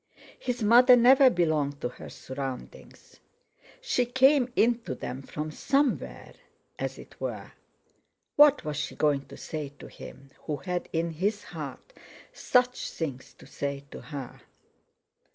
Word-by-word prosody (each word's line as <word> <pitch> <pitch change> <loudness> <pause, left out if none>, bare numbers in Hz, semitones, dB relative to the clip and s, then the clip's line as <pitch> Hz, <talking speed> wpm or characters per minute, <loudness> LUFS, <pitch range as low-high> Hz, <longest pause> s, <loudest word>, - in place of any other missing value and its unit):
His 245 -2 -3
mother 245 +4 +7
never 260 +2 +7
belonged 155 - 0
to 125 - -1
her - - -11
surroundings. 130 -1 -8 0.6
She 250 - 0
came 260 +1 +4
into 230 - +1
them 125 +2 -6
from 150 +3 -5
somewhere—as 275 - -3
it - - -14
were! - - -5 0.8
What 290 - +6
was 150 -2 -3
she 150 - -3
going 145 -2 +1
to - - -11
say 150 -3 -6
to - - -11
him, 135 0 -12
who 150 - -2
had 180 +1 -4
in 165 +1 -1
his 200 +6 -1
heart - - -8 0.4
such 250 - +1
things 140 -6 -5
to - - -16
say 140 0 -4
to - - -8
her? 140 -5 -8
170 Hz, 135 wpm, -28 LUFS, -, 0.8 s, mother